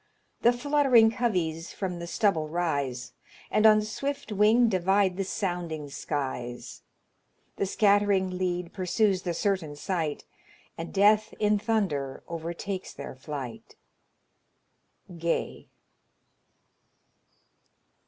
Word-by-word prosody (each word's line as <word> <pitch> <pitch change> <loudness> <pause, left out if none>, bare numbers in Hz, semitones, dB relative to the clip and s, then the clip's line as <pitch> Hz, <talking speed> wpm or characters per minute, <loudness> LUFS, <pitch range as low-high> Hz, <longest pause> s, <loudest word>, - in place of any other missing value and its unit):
The 240 - +6
fluttering 255 -3 +4
coveys 175 -9 -1
from 180 -3 -4
the 170 - -6
stubble 170 -5 +1
rise, 140 -7 -2 0.4
And 215 +1 +5
on 215 0 +6
swift 275 +4 -4
wing 215 +4 +4
divide 190 -1 +2
the 195 - -1
sounding 175 -6 -3
skies; 130 -4 -4 0.8
The - - 0
scatt'ring 200 -2 +3
lead 180 -1 -2
pursues 190 +1 +1
the 175 -2 -3
certain 185 -6 -1
sight, 160 -2 -3 0.5
And 165 +1 -6
death 210 +2 +3
in 210 -1 +3
thunder 190 - -1
overtakes 170 +3 -5
their 140 - -8
flight." 130 -2 -7 1.4
GAY. 170 0 -2
185 Hz, 100 wpm, -27 LUFS, 160-210 Hz, 1.4 s, The